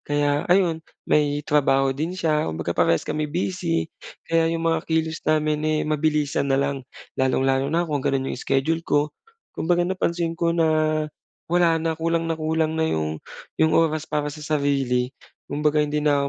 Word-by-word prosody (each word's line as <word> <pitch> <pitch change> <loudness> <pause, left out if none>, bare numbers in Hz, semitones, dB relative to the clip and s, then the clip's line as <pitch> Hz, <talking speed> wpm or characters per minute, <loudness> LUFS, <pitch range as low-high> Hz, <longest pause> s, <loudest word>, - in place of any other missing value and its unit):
Kaya 145 +1 0
ayun, 175 -3 +3 0.2
may 145 -1 +1
trabaho 135 -2 +2
din 160 +7 -3
siya 155 - +1
kumbaga 80 +2 -3
parehas 85 -1 +2
kami 155 0 -2
busy, 175 0 -1 0.4
kaya 165 0 +2
'yong 165 0 -2
mga 165 0 0
kilos 160 0 0
namin, 155 -1 +2
eh, 155 0 +1
mabilisan 150 -2 0
na 135 - +3
lang. 140 -2 -2 0.3
Lalong-lalo 135 +1 +2
na 170 +3 +1
kung 150 -4 -2
gano'n 135 0 -1
'yong - - -6
schedule 145 +5 0
ko. 145 -2 0 0.4
Kumbaga 175 +1 +1
napansin 175 -2 -1
ko 170 0 0
na, 155 -1 +2 0.5
wala 175 -2 +4
na, 160 0 -1
kulang 165 0 0
na 165 - -1
kulang 160 0 0
na 160 - +2
'yong, 80 - -2 0.4
'yong 160 0 +4
oras 155 -1 +2
para 150 -1 -1
sa 155 - -10
sarili, 140 -4 0 0.4
kumbaga 150 +1 +1
hindi 150 0 -1
na 140 -1 +2
155 Hz, 165 wpm, -23 LUFS, 140-165 Hz, 0.5 s, wala